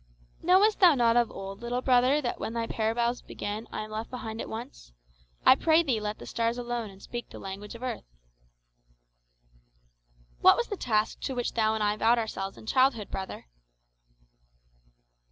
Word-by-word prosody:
"Knowest 385 +5 +4
thou 355 -6 +7
not 235 -2 +3
of 240 -1 +3
old, 195 +2 -8
little 245 +1 -2
brother, 255 +3 +4
that 240 - -2
when 225 - -4
thy 230 -1 -1
parables 235 +2 -1
begin 210 +2 -6
I - - -4
am 215 0 -8
left 220 +1 -4
behind 225 -3 -6
at - - -6
once? - - -8 0.5
I - - +9
pray 320 +4 +3
thee, 255 -8 0
let 210 0 -4
the - - -10
stars 230 +1 -1
alone, 240 -2 -3
and 195 -1 -15
speak 240 +4 -7
the - - -10
language 195 +3 -7
of 230 - -10
earth." 255 - -4 2.3
"What - - +7
was 475 - -1
the 410 - -2
task 215 - 0
to 265 - -4
which 245 -1 -2
thou 220 -1 +2
and 215 - -1
I 210 0 +2
vowed 230 +2 +4
ourselves 195 -4 -3
in - - -12
childhood, 255 -3 +2
brother?" 190 0 -6
230 Hz, 175 wpm, -28 LUFS, 215-250 Hz, 2.3 s, I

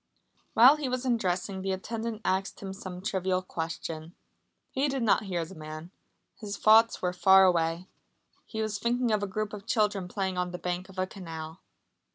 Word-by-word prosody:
While 260 +6 +8
he 290 -4 -2
was 255 +1 -2
undressing 190 -5 0
the 190 0 -1
attendant 225 +3 -4
asked 190 +1 -1
him 195 -1 -6
some 185 -1 -8
trivial 185 -2 0
question. 165 -1 -5 0.6
He 270 +2 +1
did 270 -3 -1
not 215 0 +3
hear 175 -4 -2
the 170 - -11
man. 155 +1 -8 0.5
His 205 -2 -5
thoughts 220 0 +5
were 180 0 +1
far 190 +1 +6
away. 170 -1 +1 0.6
He 220 -1 -3
was 210 -2 -3
thinking 240 +2 +1
of 210 -1 +2
a 205 - -1
group 210 +2 -3
of 210 +1 -8
children 210 -6 +1
playing 190 -1 -2
on 180 0 -1
the 180 - -5
bank 180 +1 -4
of 190 - -14
a 185 - +1
canal. 165 -3 -8
190 Hz, 185 wpm, -29 LUFS, 180-220 Hz, 0.6 s, While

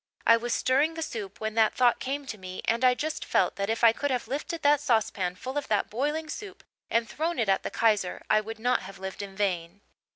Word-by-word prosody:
I 230 - +7
was 240 +1 -3
stirring 280 +7 +2
the 325 - -3
soup 205 -9 -6
when 220 0 -3
that 220 -1 +3
thought 245 -2 +3
came 280 +2 -3
to 225 -5 -6
me 185 0 -7
and 235 +2 +1
I 250 -1 +5
just 310 +4 -3
felt - - +1
that 200 +1 -2
if 225 +1 -1
I 230 - +8
could 285 +4 -2
have 250 -2 -1
lifted 300 +4 -4
that 290 0 +5
saucepan 220 -8 0
full 260 +9 -3
of 290 - -9
that 210 -2 0
boiling 295 +7 -1
soup 395 +5 -8 0.3
and 230 0 +1
thrown 325 +8 -2
it 225 - +1
at 195 - +3
the - - -4
Kaiser 210 -5 +1
I 215 - +4
would 225 +1 -7
not 245 +3 +1
have 195 +1 -10
lived 190 +1 -6
in 195 -1 -8
vain." 190 -2 -2
230 Hz, 240 wpm, -28 LUFS, 205-285 Hz, 0.3 s, I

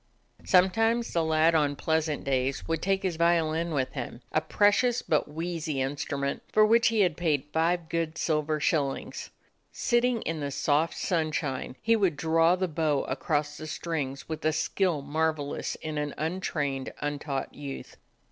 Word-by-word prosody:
Sometimes 225 +5 +3
the 170 - +2
lad 160 +1 +3
on 145 -3 +2
pleasant 160 0 0
days 135 0 -1
would 165 -1 -1
take 195 +1 0
his 180 -4 -1
violin 170 -1 +2
with 130 -4 -1
him; 125 -2 -6
a 155 - +2
precious 220 +7 +2
but 155 - +1
wheezy 160 -2 -3
instrument, 140 +1 -2
for 215 0 +5
which 230 +2 +4
he 225 -2 +2
had 180 -5 +2
paid 155 -5 0
five 165 +1 +1
good 165 -1 -2
silver 155 -1 0
shillings. 145 -3 -1 0.4
Sitting 240 -1 +1
in 165 -1 -3
the 145 -1 -2
soft 150 +3 +1
sunshine 155 -7 -1
he 230 0 +4
would 190 -8 +1
draw 165 +2 +3
the 185 0 -1
bow 155 -3 0
across 145 +2 -1
the 155 - -7
strings 150 -4 -4
with 160 -1 -5
a 155 0 +2
skill 170 -2 0
marvelous 155 0 -1
in 155 -1 -4
an 150 -1 -3
untrained, 150 -5 -2
untaught 145 -2 -3
youth. 140 -2 -8
160 Hz, 155 wpm, -28 LUFS, 145-175 Hz, 0.4 s, for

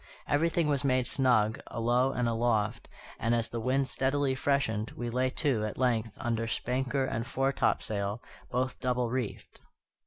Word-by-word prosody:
Everything 160 +2 +2
was 145 -1 +1
made 130 -2 +2
snug, 120 -5 +3
alow 120 +3 +2
and 125 -2 0
aloft; 115 -1 0 0.3
and, 115 +1 +2
as 115 -1 0
the 115 - -4
wind 130 +3 +1
steadily 135 +1 +1
freshened, 130 -6 0
we 120 -1 -3
lay 130 +2 +1
to, 130 -5 0
at 105 - -3
length, 115 -4 0
under 115 -2 -1
spanker 130 +4 -1
and 115 -2 -3
foretopsail, 110 -6 0 0.3
both 130 +1 -1
double 125 -2 0
reefed. 125 -4 -4
125 Hz, 150 wpm, -30 LUFS, 115-135 Hz, 0.3 s, snug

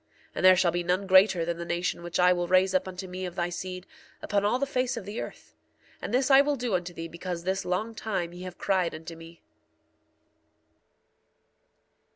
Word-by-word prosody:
And - - -4
there 185 0 +8
shall 175 -1 +3
be 175 +1 -1
none 180 +3 0
greater 190 -2 +5
than 170 0 -2
the - - -3
nation 175 +1 -2
which 175 0 -4
I 180 0 +6
will 175 -1 -2
raise 185 +1 +3
up 185 - +1
unto 185 0 -6
me 185 +1 -6
of 175 - -9
thy 175 -1 -1
seed, 185 +1 -6 0.3
upon 200 -1 -1
all 210 +4 +2
the 280 - 0
face 255 -2 -1
of 215 - -6
the 205 +3 -5
earth. - - -10 0.5
And - - -5
thus 260 +3 +2
I 270 +1 +8
will 290 0 0
do 245 -4 -3
unto 180 -1 -1
thee 165 -1 -6
because 170 +1 -6
this 190 +2 -2
long 200 +6 -2
time 195 -6 -3
ye 175 - -10
have 185 -1 -8
cried 185 -4 0
unto 165 +1 -9
me. 165 +1 -14
185 Hz, 205 wpm, -27 LUFS, 175-200 Hz, 0.5 s, there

